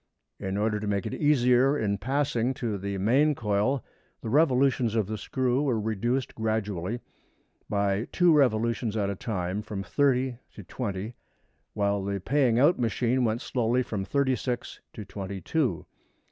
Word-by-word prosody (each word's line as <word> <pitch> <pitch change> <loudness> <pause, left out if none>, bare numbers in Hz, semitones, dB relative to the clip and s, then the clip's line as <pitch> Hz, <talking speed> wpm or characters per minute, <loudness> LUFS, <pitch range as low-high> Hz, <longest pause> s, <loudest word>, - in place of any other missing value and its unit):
In 95 0 -3
order 105 0 0
to 105 - -4
make 100 -2 -1
it - - -4
easier 135 -1 +3
in 100 -4 -1
passing 130 0 0
to 110 -6 -3
the 100 +1 -3
main 135 +10 +3
coil 110 +4 0 0.4
the 110 - -4
revolutions 130 -5 +3
of 110 -3 +2
the 110 +3 -4
screw 125 +4 0
were 130 -6 +1
reduced 115 +5 -1
gradually, 110 -1 -2 0.7
by 100 +1 0
two 175 -2 +4
revolutions 115 -4 +2
at 100 -1 0
a - - -4
time 95 -1 -3
from 105 -2 -5
thirty 130 -1 +1 0.2
to 105 - -9
twenty, 105 +1 -4 0.6
while 100 -1 0
the 100 0 -2
paying 130 +2 +2
out 145 +6 +4
machine 120 +2 +1
went 115 +1 0
slowly 125 +1 0
from 105 -5 -3
thirty 130 +4 +1
six 120 +1 -4
to 105 - -8
twenty 95 -1 -6
two. 120 - -1
115 Hz, 160 wpm, -27 LUFS, 100-130 Hz, 0.7 s, two